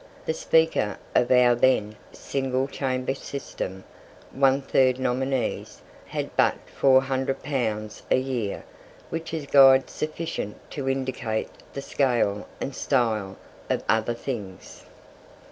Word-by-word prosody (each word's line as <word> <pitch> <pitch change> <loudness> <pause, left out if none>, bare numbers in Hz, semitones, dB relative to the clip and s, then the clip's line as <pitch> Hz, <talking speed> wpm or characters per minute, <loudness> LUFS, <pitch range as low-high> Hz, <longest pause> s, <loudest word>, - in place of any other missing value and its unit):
The 160 - 0
Speaker 160 -11 +2 0.2
of 120 - +3
our 125 -1 +6
then 120 -4 +2 0.2
single 135 -1 -2
Chamber 130 -1 -2
system 95 -9 -6 0.5
one 135 0 +3
third 130 -1 +3
nominees 130 0 -2 0.2
had - - -4
but - - +4 0.2
400 135 0 +2
pounds 110 -7 -2
a - - +4
year, 125 -6 -2 0.5
which 165 0 -4
is 160 -3 -3
guide 135 -1 +6
sufficient 155 -8 -4
to 135 -2 -3
indicate 130 -4 -2 0.2
the 140 - -5
scale 120 -9 0
and 135 - -4
style 110 -8 0 0.3
of - - 0
other 110 +1 +1
things. 105 -7 -7
130 Hz, 115 wpm, -25 LUFS, 115-135 Hz, 0.5 s, our